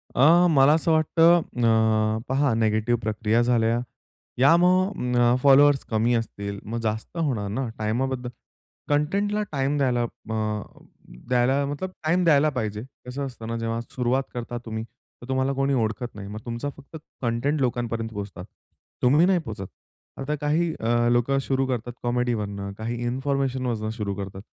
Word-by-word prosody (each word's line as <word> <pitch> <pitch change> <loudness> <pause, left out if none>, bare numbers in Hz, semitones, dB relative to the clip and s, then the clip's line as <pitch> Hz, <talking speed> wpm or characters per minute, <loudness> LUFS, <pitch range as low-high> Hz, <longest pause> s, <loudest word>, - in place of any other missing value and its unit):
अ, 165 +7 +6
मला 140 -1 +5
असं 165 +1 +1
वाटतं 165 +2 +4
अ, 110 -4 +1
पहा 135 -1 +2
निगेटिव्ह 110 +1 +1
प्रक्रिया 110 +1 +1
झाल्या 120 -1 +2 0.6
या 140 +6 +6
मग 180 -7 +2
अं, 120 0 +4
फॉलोवर्स 140 0 +6
कमी 115 +2 +1
असतील 100 -3 -4
मग 115 +2 -4
जास्त 110 +9 -3
होणार 130 -11 -1
ना 125 +4 -2
टाईमाबद्दल 125 +3 -1 0.6
कंटेंटला 200 +9 +1
टाईम 140 0 0
द्यायला 125 -4 +1
अ, 110 -2 -3 0.7
द्यायला 130 +3 +2
मतलब 145 +7 -4
टाईम 175 +4 +2
द्यायला 155 -2 +4
पाहिजे. 110 -5 -3 0.2
कसं 135 +3 -4
असतं 120 -4 -8
ना, 115 0 -3
जेव्हा 115 0 -2
सुरुवात 125 +2 -1
करता 120 0 -5
तुम्ही, 110 -1 -4
तर 120 +1 -18
तुम्हाला 130 +1 +1
कोणी 135 +1 0
ओळखत 115 0 -2
नाही. 100 -1 -8
मग 105 +2 -7
तुमचा 120 +4 -3
फक्त 145 +2 -14 0.3
कंटेंट 125 +5 0
लोकांपर्यंत 115 -2 -1
पोहोचतात. 100 -3 -7 0.6
तुम्ही 145 +7 +5
नाही 185 -1 +3
पोहचत. 110 - -7 0.5
आता 140 +3 -2
काही 155 +3 +1
अ, 120 +1 +2
लोकं 120 +3 +2
शुरू 135 0 0
करतात 120 -1 -3
कॉमेडीवरनं, 110 -5 -2
काही 115 +2 -4
इन्फॉर्मेशनवरनं 130 -3 -1
सुरू 100 -1 -2
करतात. 95 0 -7
125 Hz, 150 wpm, -25 LUFS, 110-140 Hz, 0.7 s, अ